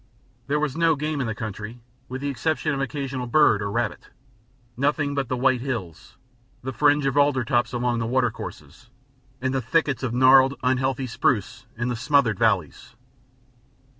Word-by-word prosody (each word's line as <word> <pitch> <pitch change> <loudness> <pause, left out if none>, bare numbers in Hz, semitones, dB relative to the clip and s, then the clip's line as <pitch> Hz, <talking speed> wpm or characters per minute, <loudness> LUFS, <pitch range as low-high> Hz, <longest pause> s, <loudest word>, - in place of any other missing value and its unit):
There 150 +1 +1
was 150 -3 -1
no 165 -1 +3
game 150 0 -2
in 125 - -2
the 110 - -3
country, 110 +2 -6 0.3
with 130 +1 -5
the 145 - -2
exception 155 +3 -1
of 140 - -2
an - - 0
occasional 135 -3 -4
bird 120 -6 +4
or 100 - -2
rabbit, 115 +1 -3 0.7
nothing 145 +2 0
but 135 -4 -2
the 130 - -1
white 130 -1 +2
hills, 115 - -6 0.5
the 130 +1 -4
fringe 145 +3 +3
of 135 -1 0
alder 145 -3 +3
tops 120 +1 0
along 120 -1 -1
the 115 - -2
watercourses, 125 -1 -3 0.5
and 130 0 0
the 135 - 0
thickets 140 +3 0
of 130 -3 -2
gnarled, 130 +2 +5
unhealthy 130 +1 0
spruce 120 -3 -1
in 120 +2 -2
the 120 - -1
smothered 125 -4 +2
valleys. - - 0
130 Hz, 170 wpm, -24 LUFS, 120-140 Hz, 0.7 s, gnarled